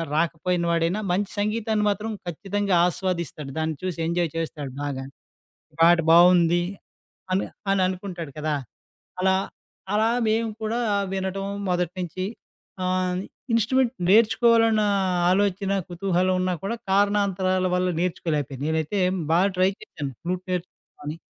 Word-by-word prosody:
రాకపోయిన 170 +2 0
వాడైనా 170 +4 +1
మంచి 195 +2 0
సంగీతాన్ని 215 0 0
మాత్రం 210 +2 -2 0.2
ఖచ్చితంగా 195 +3 -1
ఆస్వాదిస్తాడు 170 -6 -3
దాన్ని 160 0 -1
చూసి 185 -2 -3
ఎంజాయ్ 170 -1 0
చేస్తాడు 150 -4 -4
బాగా. 135 -2 -3 0.8
పాట 170 +1 +7
బావుంది 175 0 +6 0.7
అని, 190 - +1 0.3
అని 195 -1 +2
అనుకుంటాడు 180 -4 -5
కదా! 150 0 -1 0.7
అలా 190 0 +3 0.6
అలా 220 +2 +3 0.2
మేము 225 +1 +1
కూడా 225 +2 -1 0.3
వినటం, 190 0 -2 0.2
మొదటి 180 -1 0
నుంచి 180 +1 -3 0.6
ఆహ్, 185 0 0 0.4
ఇన్స్ట్రుమెంట్ 245 +3 +2 0.2
నేర్చుకోవాలన్న 225 +1 +5 0.5
ఆలోచన, 195 0 +1 0.2
కుతూహలం 185 +1 +1
ఉన్నా 185 0 0
కూడా 210 +4 -2 0.2
కారణాంతరాల 195 -2 +2
వల్ల 180 0 +1
నేర్చుకోలేకపోయాను. 150 -6 -2
నేనైతే 160 +5 -1 0.3
బాగా 185 +4 +4
ట్రై 185 +1 +4
చేశాను 140 -2 -6
ఫ్లూట్ 180 +1 -3
నేర్చుకుందామని. 170 -4 -6
185 Hz, 115 wpm, -24 LUFS, 170-200 Hz, 0.8 s, పాట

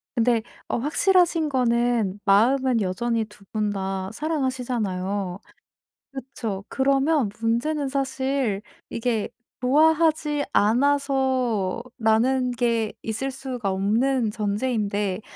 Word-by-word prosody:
근데 235 -1 +2 0.3
어 - - -1
확실하신 330 +3 +2
거는 235 -6 +1
마음은 240 +4 +3
여전히 225 +4 -1
2 210 -1 -17
분 215 -1 0
다 190 -1 -3
사랑하시잖아요. 225 - -2 0.7
그쵸. 230 -7 -5
그러면 275 -1 +2
문제는 270 +6 0
사실 265 -5 -1 0.3
이게 230 -2 -1 0.3
'좋아하지 305 +2 +3
않아서.'라는 250 -1 +1
게 230 -2 0
있을 225 +5 -2
수가 255 -5 -4
없는 225 +5 +1
전제인데 210 -2 -1
240 Hz, 220 characters per minute, -24 LUFS, 210-270 Hz, 0.7 s, 마음은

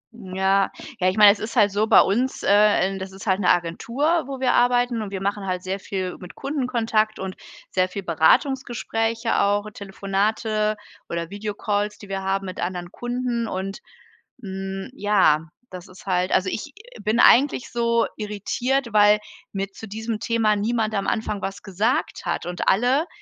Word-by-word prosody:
Ja. 195 -2 +1 0.3
Ja, 185 0 +3
ich 185 - -3
meine, 210 -1 +9
es 205 - -3
ist 225 +1 -5
halt 205 -1 +4
so 210 +2 +1
bei - - +7
uns 245 +7 0
äh, - - +2 0.4
ähm, 195 0 -5
das 190 0 -6
ist 190 0 -11
halt 190 -2 +2
'ne 180 - +2
Agentur, 235 - +1
wo 270 -1 -6
wir 255 -1 +2
arbeiten. 245 -1 +2
Und 210 - -5
wir 195 -1 -5
machen 200 0 -2
halt 180 -1 -2
sehr 190 +1 -3
viel 185 -2 -4
mit 180 - -11
Kundenkontakt 235 -6 0
und 190 -1 -5 0.4
sehr 185 0 +1
viel 195 +1 -6
Beratungsgespräche 225 - +1
auch, 205 +1 +1
Telefonate 210 +2 -1 0.3
oder 170 0 -4
Videocalls, 205 0 -2
die 205 - -13
wir 195 0 -3
haben 195 +1 -1
mit 185 -1 -7
anderen 175 -1 -4
Kunden 240 -1 -2
und, 195 0 -4 0.6
hm, 195 -1 -5
ja, 195 - +3 0.2
das 180 -1 -9
ist 185 0 -15
halt 185 -1 0
also, 185 - +2
ich 210 - -5 0.3
bin 215 +2 0
eigentlich 265 0 +5
so 235 -1 +2
irritiert, 230 +4 -2
weil 210 0 +6 0.3
mir 195 0 -3
zu 225 - -10
diesem 220 +1 -4
Thema 225 -2 +1
niemand 220 +1 0
am 200 -2 -1
Anfang 215 -2 -1
was 195 +1 -5
gesagt 210 +6 -1
hat - - -2
und 175 0 -4
alle, 255 - +2
205 Hz, 175 wpm, -23 LUFS, 190-230 Hz, 0.6 s, meine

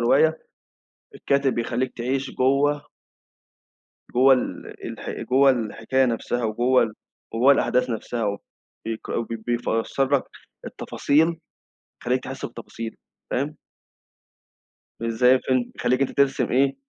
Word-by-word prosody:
رواية 155 +7 +4 0.8
الكاتب 140 -2 +1
بيخليك 120 +2 -1
تعيش 130 +3 -2
جوّه. 145 +3 +1 1.3
جوّه 130 +2 +6
ال 125 - -3
الح - - -7 0.2
جوّه 135 +2 +6
الحكاية 120 +2 +1
نفْسها، 120 0 -1
وجوّه 120 0 +2 0.4
وجوّه 125 +5 +5
الأحداث 125 -2 +2
نفْسها 110 -2 -2 0.5
بيك 115 0 -5 0.2
بي 115 - -2
بيفسّر 120 +4 0
لك 135 - 0 0.4
التفاصيل، 150 +3 +1 0.7
يخلّيك 125 +1 0
تحس 135 - -5
بتفاصيل، 115 -1 -7 0.4
فاهم؟ 145 +4 -1 1.4
مش 115 - -3
زي 125 +3 +5
الفيلم، 130 -1 0
بيخلّيك 130 +2 +1
أنت 135 - +1
ترسم 140 -1 +1
إيه، 135 +2 +3
130 Hz, 110 wpm, -24 LUFS, 115-135 Hz, 1.4 s, جوّه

